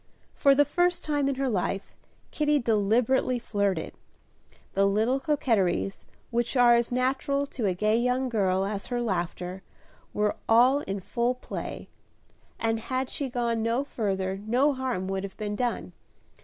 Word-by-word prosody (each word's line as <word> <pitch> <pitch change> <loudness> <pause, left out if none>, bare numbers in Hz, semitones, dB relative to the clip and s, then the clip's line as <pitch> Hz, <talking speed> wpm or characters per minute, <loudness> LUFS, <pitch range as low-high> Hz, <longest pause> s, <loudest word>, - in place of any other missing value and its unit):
For 275 -1 +4
the 290 +1 +5
first 350 +4 +1
time 290 -2 +1
in 275 - -1
her 270 +1 -1
life, 195 -3 -2 0.4
Kitty 300 -1 +2
deliberately 235 +2 +2
flirted. 200 -7 -1 0.8
The 195 0 +3
little 220 +7 +2
coquetries, 225 - 0 0.3
which 240 +2 0
are 240 -1 +7
as 235 0 +2
natural 265 +3 0
to 245 -6 -3
a 185 - 0
gay 215 +4 +2
young 250 +2 +1
girl 195 -5 +1
as 200 0 -4
her 245 -1 -2
laughter, 180 -3 -3 0.5
were 210 0 0
all 250 +5 +6
in 195 -7 -4
full 240 +6 0
play, 250 - -6 0.7
and 225 0 0
had 255 +3 -3
she 280 -2 -3
gone 235 -2 -1
no 230 +4 +1
further 195 -7 -2
no 255 +7 +2
harm 255 -8 -2
would 195 0 -2
have 195 -1 -7
been 210 -1 -3
done. 240 +2 -2
235 Hz, 155 wpm, -27 LUFS, 200-260 Hz, 0.8 s, are